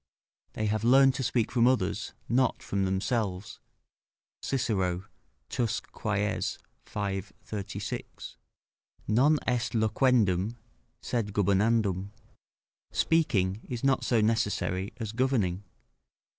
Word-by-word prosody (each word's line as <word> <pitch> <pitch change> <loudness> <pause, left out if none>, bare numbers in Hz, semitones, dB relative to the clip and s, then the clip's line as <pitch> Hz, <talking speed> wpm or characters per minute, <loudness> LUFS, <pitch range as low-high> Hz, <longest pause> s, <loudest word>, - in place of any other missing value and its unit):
["They 110 - -2
have 110 +1 0
learned 135 +2 +6
to 130 - -3
speak 120 -2 0
from 120 -1 +4
others, 130 0 0
not 125 +1 +1
from 100 -1 -1
themselves." 95 0 -2 0.8
Cicero, 95 -8 -1 0.4
Tusc. 120 -4 -2
Quaes, 105 0 -1 0.3
v. 100 -2 -2 0.2
36.] 100 -1 -6 0.7
"Non 135 +8 +4
est 120 -1 0
loquendum, 110 -3 +2 0.5
sed 115 -4 -1
gubernandum." 100 -1 +2 0.8
["Speaking 110 - +1
is 120 -1 -4
not 135 -1 +2
so 115 -3 +2
necessary 105 -3 0
as 110 -4 -4
governing." 110 -7 0
110 Hz, 100 wpm, -29 LUFS, 100-125 Hz, 0.8 s, learned